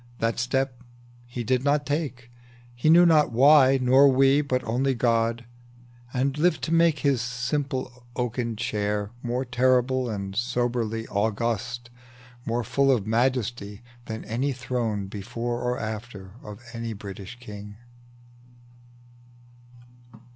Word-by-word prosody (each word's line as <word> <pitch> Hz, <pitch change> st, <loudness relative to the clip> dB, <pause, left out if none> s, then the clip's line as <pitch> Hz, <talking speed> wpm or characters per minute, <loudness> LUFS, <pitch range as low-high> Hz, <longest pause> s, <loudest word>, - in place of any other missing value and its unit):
That 115 Hz, 0 st, -1 dB
step 125 Hz, 0 st, -1 dB, 0.5 s
he 120 Hz, 0 st, -5 dB
did 125 Hz, +2 st, +1 dB
not 145 Hz, +1 st, +2 dB
take, 140 Hz, -5 st, -3 dB, 0.4 s
He 120 Hz, +6 st, 0 dB
knew 175 Hz, +2 st, +7 dB
not 155 Hz, -5 st, +4 dB
why, 135 Hz, +2 st, +6 dB
nor 130 Hz, +2 st, +6 dB
we, 135 Hz, +2 st, +4 dB
but 130 Hz, -3 st, -1 dB
only 130 Hz, +4 st, 0 dB
God, 115 Hz, 0 st, +1 dB, 0.7 s
And 135 Hz, +2 st, 0 dB
lived 170 Hz, 0 st, +2 dB
to 165 Hz, -, -1 dB
make 165 Hz, -4 st, +3 dB
his 135 Hz, -3 st, +2 dB
simple 125 Hz, 0 st, -3 dB
oaken 120 Hz, -1 st, -2 dB
chair 105 Hz, -2 st, -2 dB
More 125 Hz, +2 st, -2 dB
terrible 130 Hz, 0 st, +2 dB
and 100 Hz, -3 st, -4 dB
grandly 120 Hz, 0 st, -1 dB
beautiful, 110 Hz, +2 st, -1 dB, 0.8 s
More 120 Hz, +1 st, 0 dB
full 135 Hz, +5 st, +2 dB
of 115 Hz, -7 st, +1 dB
majesty 115 Hz, -2 st, -1 dB, 0.2 s
than 110 Hz, 0 st, -6 dB
any 130 Hz, +5 st, -1 dB
throne 120 Hz, -5 st, -2 dB
Before 115 Hz, +5 st, -4 dB
or 125 Hz, 0 st, -1 dB
after, 110 Hz, -3 st, -6 dB
of 105 Hz, 0 st, -10 dB
a 115 Hz, -1 st, -4 dB
British 100 Hz, +2 st, -9 dB
king. 105 Hz, -3 st, -9 dB
120 Hz, 125 wpm, -25 LUFS, 115-130 Hz, 0.8 s, knew